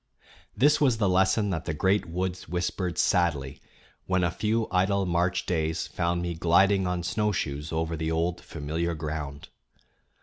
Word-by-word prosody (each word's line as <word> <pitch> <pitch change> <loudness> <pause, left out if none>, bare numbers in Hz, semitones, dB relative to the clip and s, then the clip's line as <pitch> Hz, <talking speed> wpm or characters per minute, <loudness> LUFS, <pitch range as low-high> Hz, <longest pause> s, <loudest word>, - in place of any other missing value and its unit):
This 145 +3 +4
was 130 -6 +3
the 105 -3 +1
lesson 95 +3 +2
that 80 - -3
the 75 - -2
great 95 +5 +1
woods 90 0 -3
whispered 90 +1 -2
sadly 75 -7 +1 0.5
when 95 -1 +1
a 85 - +1
few 110 +4 0
idle 95 +1 +2
March 90 0 0
days 80 -2 -1
found 85 0 -1
me 85 0 -2
gliding 95 +4 +3
on 90 -1 -2
snowshoes 85 -8 -1
over 80 0 -1
the 80 0 -2
old 85 +2 -1
familiar 80 +2 -3
ground. 75 -2 -5
85 Hz, 155 wpm, -27 LUFS, 80-95 Hz, 0.5 s, This